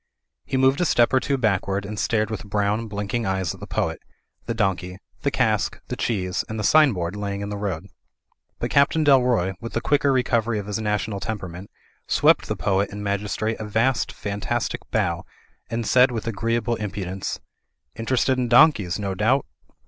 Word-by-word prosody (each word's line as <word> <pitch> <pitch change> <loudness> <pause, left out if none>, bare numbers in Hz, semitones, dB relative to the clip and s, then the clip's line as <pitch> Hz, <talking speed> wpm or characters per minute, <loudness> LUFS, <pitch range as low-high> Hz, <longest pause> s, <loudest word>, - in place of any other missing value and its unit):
He 135 - -1
moved 130 +4 +3
a - - +3
step 120 -6 +3
or 130 - +5
two 140 +1 -1
backward 100 -4 0
and 105 0 -5
stared 110 -2 0
with 110 - -4
brown, 105 +3 0
blinking 105 +2 -3
eyes 95 -2 -1
at - - -13
the - - -8
poet, - - -1 0.5
the 115 - -2
donkey, 95 -4 -1 0.2
the - - +1
cask, - - 0
the - - -2
cheese, 90 -5 -1
and 110 0 -4
the - - -2
sign 150 +5 +6
board 90 -2 -3
lying 100 -1 -3
in 100 - -4
the 105 - -4
road. 100 -5 -3 0.7
But - - -3
Captain 140 +3 +3
Dalroy, 125 -9 +4
with 115 - -7
the - - +1
quicker 140 +2 +2
recovery 120 -3 +1
of 100 - -4
his 105 +1 -3
national 105 -1 -1
temperament, 95 -3 -6 0.4
swept - - +4
the - - -1
poet 100 0 0
and 105 0 -6
magis 100 0 -2
trate 110 +1 -2
a 110 - -4
vast 115 +5 +1
fantastic 105 +3 -3
bow 90 -6 0 0.5
and 115 0 -2
said 125 +3 +5
with 115 -3 -4
agreeable 115 +1 -1
impudence, 95 -2 -4 0.6
"interested 130 +3 +1
in 125 - 0
donkeys, 120 - +5
no 100 -2 -2
doubt?" 115 +8 +2
110 Hz, 185 wpm, -23 LUFS, 100-120 Hz, 0.7 s, sign